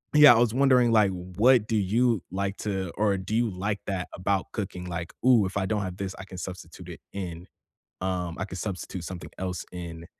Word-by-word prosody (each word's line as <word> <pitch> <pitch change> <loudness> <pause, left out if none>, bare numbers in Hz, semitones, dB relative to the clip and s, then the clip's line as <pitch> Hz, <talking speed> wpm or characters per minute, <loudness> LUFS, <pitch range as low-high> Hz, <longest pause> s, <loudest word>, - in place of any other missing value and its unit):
Yeah, 150 -4 +10
I - - +3
was 120 -1 +3
wondering, 125 -3 +4
like, 105 -3 +5
what 105 +6 +3
do 115 - 0
you 110 +1 +2
like 100 +1 -2
to 95 -4 -3
or 105 -2 +2
do 95 +4 -3
you 120 -1 +2
like 100 +2 -2
that 95 -2 -2
about 95 +1 -1
cooking? 95 -4 -5
Like, 85 0 -5
"Ooh, 120 -6 +6
if 95 - -5
I 95 - 0
don't 105 0 0
have 90 -1 -5
this, 95 -1 -4
I - - -6
can 95 -1 -10
substitute 95 0 -8
it - - -8
in, 90 -2 -6 0.5
um 90 -2 -2
I 95 - -2
could 95 - -8
substitute 90 -3 -5
something 90 0 -7
else 90 -2 -3
in." 85 -2 -7
95 Hz, 210 wpm, -27 LUFS, 90-110 Hz, 0.5 s, Yeah